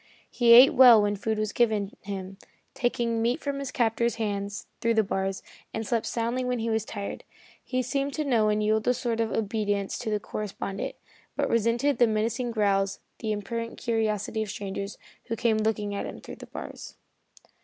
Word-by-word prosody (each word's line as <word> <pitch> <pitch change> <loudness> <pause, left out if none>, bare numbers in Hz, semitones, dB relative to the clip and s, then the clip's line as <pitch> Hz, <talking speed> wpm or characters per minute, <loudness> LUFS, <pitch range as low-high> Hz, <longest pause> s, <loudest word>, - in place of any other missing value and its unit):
He 235 -2 +5
ate 250 +3 +9
well 245 -3 +9
when 205 0 +1
food 220 +2 -2
was 215 -1 -2
given 215 -4 +1
him, 195 -1 -6 0.3
taking 235 -2 0
meat 235 +2 +1
from 280 -1 -3
his 275 -2 -4
captor's 235 0 +1
hands 205 -2 -3
through 230 0 +1
the 220 - +4
bars, 195 -1 -2 0.3
and 225 0 -3
slept 230 +1 0
soundly 235 +2 -1
when 250 0 -1
he 230 0 -1
was 220 -1 0
tired. 200 -1 -6 0.4
He 255 0 -1
seemed 275 +3 -2
to 305 - -1
know 225 -6 +3
and 210 0 +1
yield 215 +1 +1
a 250 - +4
sort 235 -2 -2
of 225 -1 0
obedience 205 -2 -1
to 245 - -3
the 210 -1 0
correspondent, 200 -1 -5 0.4
but - - 0
resented 230 +5 +2
with 240 -2 +5
menacing 230 +3 0
growls 200 -3 +1 0.2
the 220 - -2
impertinent 230 +3 -4
curiosity 220 -1 -1
of 215 - -3
strangers 200 0 -5 0.3
who 230 - -3
came 225 -1 +2
to 215 - 0
look 220 0 +1
at 205 -1 -3
him - - -8
through - - -10
the - - -11
bars. - - -8
220 Hz, 190 wpm, -27 LUFS, 205-235 Hz, 0.4 s, ate